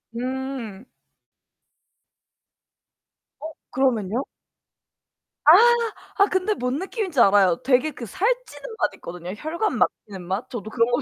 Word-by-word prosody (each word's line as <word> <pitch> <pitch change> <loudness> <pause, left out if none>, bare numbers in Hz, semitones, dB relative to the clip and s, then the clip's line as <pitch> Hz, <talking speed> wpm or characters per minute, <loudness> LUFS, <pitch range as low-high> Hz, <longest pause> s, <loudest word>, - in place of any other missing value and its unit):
음. 255 -4 -5 2.6
어, 315 +2 -6 0.2
그러면요? 245 -2 0 1.2
아 305 - +9 0.7
아 400 - +6
근데 375 +2 0
뭔 250 -6 -2
느낌인지 380 - -3
알아요. 195 -5 +5
되게 260 +3 +2
그 250 -4 -8
살찌는 480 - -3
맛 - - +1
있거든요. 175 +1 -8
혈관 335 - -2
막히는 195 -3 -2
맛. 190 +5 -3
저도 225 -5 -6
그런 230 +1 +1
거 245 - +1
255 Hz, 220 characters per minute, -23 LUFS, 215-325 Hz, 2.6 s, 아